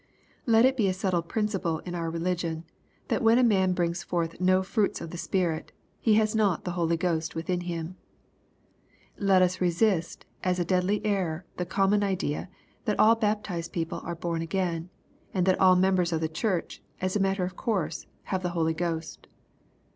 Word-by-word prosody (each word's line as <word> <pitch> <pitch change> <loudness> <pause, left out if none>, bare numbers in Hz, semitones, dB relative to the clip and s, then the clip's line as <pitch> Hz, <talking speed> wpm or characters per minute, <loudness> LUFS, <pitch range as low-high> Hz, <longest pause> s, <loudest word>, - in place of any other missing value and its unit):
Let 225 +1 +6
it 265 0 +3
be 215 -5 +3
a 185 - 0
settled 180 -3 -1
principle 200 -7 -1
in 175 - -5
our 165 -1 -2
religion 170 -1 -2 0.5
that - - +1
when 225 0 +5
a 255 - +4
man 190 -5 +3
brings 175 0 -1
forth 170 -1 -2
no 185 +1 +4
fruits 205 +1 0
of 165 - -7
the 175 - -6
Spirit, 175 -5 -1 0.3
he 220 -2 +3
has 215 0 +3
not 205 -6 +1
the 180 - -2
Holy 170 -1 0
Ghost 165 -2 -1
within 175 +2 -2
him. 175 0 -5 1.2
Let 195 -2 +4
us 185 +1 0
resist 175 -1 +1 0.2
as 180 -1 +1
a 175 - 0
deadly 185 +4 +1
error 185 -5 -1
the 180 - -2
common 200 +1 +2
idea, 185 -5 -2 0.4
that 210 -3 0
all 220 +1 +7
baptized 210 -6 -2
people 165 -2 -3
are 170 - -4
bom 170 0 -2
again, 170 -1 -2 0.5
and 180 -2 +2
that 185 -1 +3
all 185 -1 +7
members 180 -1 +2
of 165 -1 0
the 160 - +1
Church, 175 +3 -2 0.2
as 185 +1 -1
a - - +2
matter 195 -1 +1
of 180 0 -4
course, 180 -9 -2 0.2
have 190 -2 -2
the 180 - -1
Holy 160 0 +2
Ghost. 165 -1 -4
180 Hz, 185 wpm, -27 LUFS, 170-195 Hz, 1.2 s, all